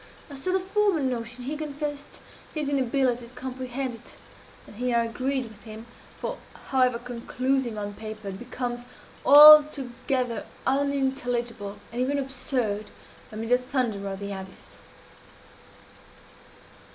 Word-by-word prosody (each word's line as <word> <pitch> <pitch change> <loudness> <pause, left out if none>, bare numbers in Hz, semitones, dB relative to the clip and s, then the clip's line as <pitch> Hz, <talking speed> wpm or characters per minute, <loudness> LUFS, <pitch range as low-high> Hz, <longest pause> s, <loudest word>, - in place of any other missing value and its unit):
As 275 - -7
to 370 - -1
the 380 - +2
former 390 -1 +1
notion 245 -2 -3
he 280 +5 -3
confessed 295 -1 -5 0.4
his 300 -2 -1
inability 255 -3 +1
to 240 - -16
comprehend 255 0 -4
it; 230 - -12 0.5
and 210 - -14
here 245 0 +1
I 235 - +3
agreed 260 +4 -1
with 220 -3 -13
him 220 0 -10 0.3
for, - - -4 0.3
however 255 -2 +3
conclusive 245 0 -2
on 205 0 -4
paper, 215 -1 -7
it 190 - -7
becomes 245 0 -4 0.4
altogether 280 -4 +6 0.2
unintelligible, 245 -6 -1
and 240 +2 -2
even 275 +3 +1
absurd, 245 -6 -1 0.4
amid 220 +1 -5
the 250 0 +5
thunder 245 -6 -2
of 195 0 -4
the 200 0 -5
abyss. 190 -1 -9
250 Hz, 125 wpm, -26 LUFS, 230-275 Hz, 0.5 s, altogether